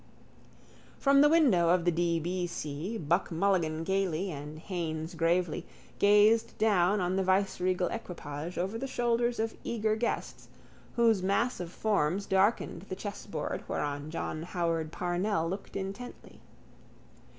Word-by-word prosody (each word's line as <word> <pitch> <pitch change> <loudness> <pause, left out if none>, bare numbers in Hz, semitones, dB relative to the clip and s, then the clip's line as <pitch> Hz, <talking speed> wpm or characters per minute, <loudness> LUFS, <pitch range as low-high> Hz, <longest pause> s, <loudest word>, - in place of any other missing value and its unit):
From 275 0 +5
the 295 - +6
window 250 - +4
of 175 0 +3
the 175 - +4
D. 170 0 +1
B. 175 +2 -2
C. 170 +5 -4
Buck 170 +2 0
Mulligan 165 -3 +1
gaily, 190 0 0
and 150 +1 -7
Haines 160 -1 -4
gravely, 170 0 +1 0.4
gazed 210 +2 +4
down 205 -2 +3
on 180 +1 0
the 195 - +2
viceregal 185 -1 +1
equipage 165 -5 -6
over 195 +6 -2
the 270 - -3
shoulders 240 -1 0
of 225 0 -1
eager 215 -2 0
guests, 235 +2 -3 0.5
whose 230 -4 +4
mass 200 +6 +1
of 175 -2 -5
forms 195 -2 0
darkened 195 -1 +1
the 185 - -3
chessboard 200 -5 -5
whereon 145 +1 -3
John 155 -1 -4
Howard 165 -2 -2
Parnell 175 0 -1
looked 190 +4 -6
intently. 200 +6 -7
185 Hz, 135 wpm, -30 LUFS, 165-210 Hz, 0.5 s, the